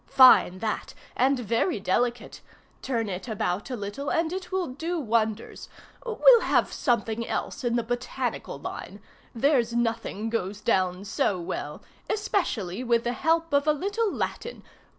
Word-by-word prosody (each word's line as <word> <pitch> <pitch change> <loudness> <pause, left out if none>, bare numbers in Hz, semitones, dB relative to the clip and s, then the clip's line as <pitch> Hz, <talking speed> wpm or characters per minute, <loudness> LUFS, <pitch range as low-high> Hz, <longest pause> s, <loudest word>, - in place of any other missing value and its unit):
Fine 255 -8 +7
that, 215 +2 -3 0.2
and 270 +2 +3
very 235 - 0
delicate! 240 +6 -1 0.4
Turn 230 -4 -1
it 190 +3 -5
about 205 -2 -2
a 255 - -2
little, 205 +6 -5
and 330 +1 0
it 370 -1 -6
will 375 -1 0
do 325 +6 -3
wonders. 225 -3 -1 0.3
We'll 475 0 +6
have - - +1
some 240 - +1
thing 225 +1 -4
else 275 - -3
in 240 -1 +1
the 235 - +1
botanical 245 +2 -3
line. - - -7 0.4
There's 240 -2 +2
nothing 225 -2 -1
goes 205 -3 -2
down 185 -3 0
so 195 -1 0
well, 170 - -5 0.3
especially 255 - -1
with 235 -1 +2
the 240 - -1
help 330 +3 +1
of 285 +1 +3
a 305 - +5
little 405 +7 -1
Latin. 480 - -4
240 Hz, 150 wpm, -26 LUFS, 215-310 Hz, 0.4 s, Fine